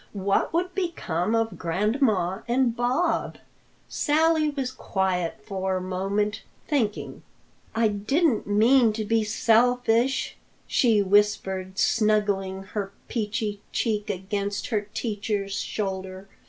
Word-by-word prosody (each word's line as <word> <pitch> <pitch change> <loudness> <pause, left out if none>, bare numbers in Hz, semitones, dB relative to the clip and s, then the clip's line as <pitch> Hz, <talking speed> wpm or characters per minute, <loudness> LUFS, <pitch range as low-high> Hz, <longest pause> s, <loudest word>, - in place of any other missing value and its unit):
What 195 0 +1
would 360 +2 -1
become 230 - -1
of 225 0 -1
Grandma 195 - +1
and 240 -1 +2
Bob?" 260 +8 0 0.5
Sally 315 0 +2
was 270 -3 -3
quiet 185 - -2
for 190 -1 -2
a - - -3
moment, 200 +3 -1 0.3
thinking. 230 -8 -1 0.5
"I 225 -1 +3
didn't 225 - +1
mean 225 +3 +4
to 215 0 -3
be 225 +1 +2
selfish," 235 +3 +2 0.3
she 225 -5 +3
whispered, 190 -1 +1
snuggling 205 -4 +1
her 200 -2 -3 0.2
peachy 210 -2 -2
cheek 215 -2 -1
against 200 +1 -3
her 210 -3 -1
teacher's 205 -3 -2
shoulder. 190 -1 -4
210 Hz, 110 wpm, -25 LUFS, 195-240 Hz, 0.5 s, mean